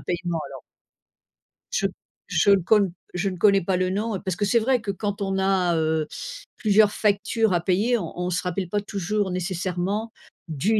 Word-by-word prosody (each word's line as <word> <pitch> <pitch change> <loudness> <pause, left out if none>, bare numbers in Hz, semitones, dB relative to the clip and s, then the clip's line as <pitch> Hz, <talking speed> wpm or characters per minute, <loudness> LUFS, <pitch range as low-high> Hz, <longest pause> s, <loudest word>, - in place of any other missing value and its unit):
paiement, 175 -1 -2
alors - - -10 1.1
je - - +2 0.4
je 200 - +4
ne 195 -1 +5
con 200 -1 +3 0.2
je 180 +3 -1
ne 185 - -5
connais 200 +2 +5
pas 185 +2 0
le 185 0 +1
nom, 210 +3 -1
heu, 185 - -5
parce 185 -2 -2
que, 205 - +1
c'est 235 +3 +3
vrai 255 +3 +2
que, 215 -3 -7
quand 205 +1 -3
on 195 -1 -1
a, 190 -2 +2
heu, 160 -1 0 0.5
plusieurs 210 -1 +4
factures 215 +1 +1
à 175 - +3
payer, 205 +8 +2
on 175 -7 -5
on 180 0 -1
se 180 0 0
rappelle 180 0 -2
pas 205 - 0
toujours 200 -1 -2
nécessairement 185 +4 -2 0.4
du 180 +8 +1
195 Hz, 190 wpm, -24 LUFS, 180-210 Hz, 1.1 s, ne